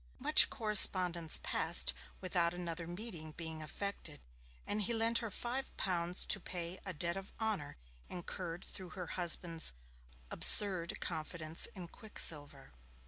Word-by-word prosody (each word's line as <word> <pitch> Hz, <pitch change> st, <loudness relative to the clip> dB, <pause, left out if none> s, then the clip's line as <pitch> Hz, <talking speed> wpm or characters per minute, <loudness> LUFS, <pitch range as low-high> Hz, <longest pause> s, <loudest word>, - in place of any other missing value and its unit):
Much -, -, +5 dB
correspondence 180 Hz, -6 st, +4 dB
passed -, -, 0 dB, 0.3 s
without 175 Hz, -2 st, -3 dB
another 170 Hz, -1 st, -8 dB
meeting 175 Hz, -4 st, -11 dB
being 160 Hz, -1 st, -8 dB
effected, 155 Hz, -1 st, -7 dB, 0.5 s
and 210 Hz, +1 st, -4 dB
he 230 Hz, +3 st, -3 dB
lent 230 Hz, +1 st, 0 dB
her 230 Hz, -, -7 dB
five 245 Hz, +6 st, -7 dB
pounds 175 Hz, -1 st, -2 dB
to 200 Hz, -, -2 dB
pay 175 Hz, 0 st, -6 dB
a -, -, -4 dB
debt 170 Hz, +1 st, -5 dB
of 195 Hz, 0 st, -11 dB
honour 215 Hz, -10 st, -6 dB, 0.3 s
incurred 175 Hz, 0 st, -10 dB
through 185 Hz, -2 st, -11 dB
her 180 Hz, -2 st, -10 dB
husband's 170 Hz, -, 0 dB, 0.6 s
'absurd 185 Hz, -5 st, +7 dB
confidence 155 Hz, 0 st, -5 dB
in 180 Hz, -3 st, -11 dB
Quicksilver'. 145 Hz, -8 st, -3 dB
175 Hz, 130 wpm, -32 LUFS, 165-195 Hz, 0.6 s, absurd